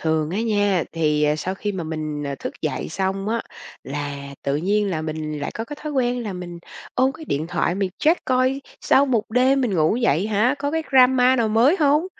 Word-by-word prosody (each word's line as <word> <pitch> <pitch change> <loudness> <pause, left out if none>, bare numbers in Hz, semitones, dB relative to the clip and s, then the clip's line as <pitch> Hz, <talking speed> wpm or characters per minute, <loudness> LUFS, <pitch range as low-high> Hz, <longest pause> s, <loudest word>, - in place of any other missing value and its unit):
Thường 160 -1 0
á 195 +5 -1
nha, 205 -5 +1
thì, 150 -2 +1
ờ, 150 0 +2
sau 185 +4 -3
khi 205 +1 -3
mà 180 -4 -4
mình, 155 -2 -4
ờ, 140 -1 -3
thức - - -6
dậy 155 - -2
xong 195 +3 -2
á, 230 +1 0 0.4
là 140 0 -5
tự 140 +1 0
nhiên 200 +5 +1
là 160 -3 -2
mình 155 -1 -4
lại 145 - -3
có 225 - -4
cái 295 +5 -8
thói 305 -1 -5
quen 245 -2 0
là 210 -3 -4
mình 180 -1 -7 0.4
ôm 260 +1 +2
cái 315 - -10
điện 155 - -2
thoại 175 0 0
mình 195 -1 -1
check 325 +4 +2
coi 255 +1 +1 0.2
sau 280 +1 +4
một 230 -4 0
đêm 260 +4 +3
mình 240 -7 0
ngủ 160 +5 +2
dậy 205 - +1
hả, 220 +5 +2
có 285 0 -1
cái 320 +1 -1
drama 255 0 +5
nào 230 -3 +1
mới 235 - +4
hông 300 +4 +3
205 Hz, 225 wpm, -22 LUFS, 155-255 Hz, 0.4 s, drama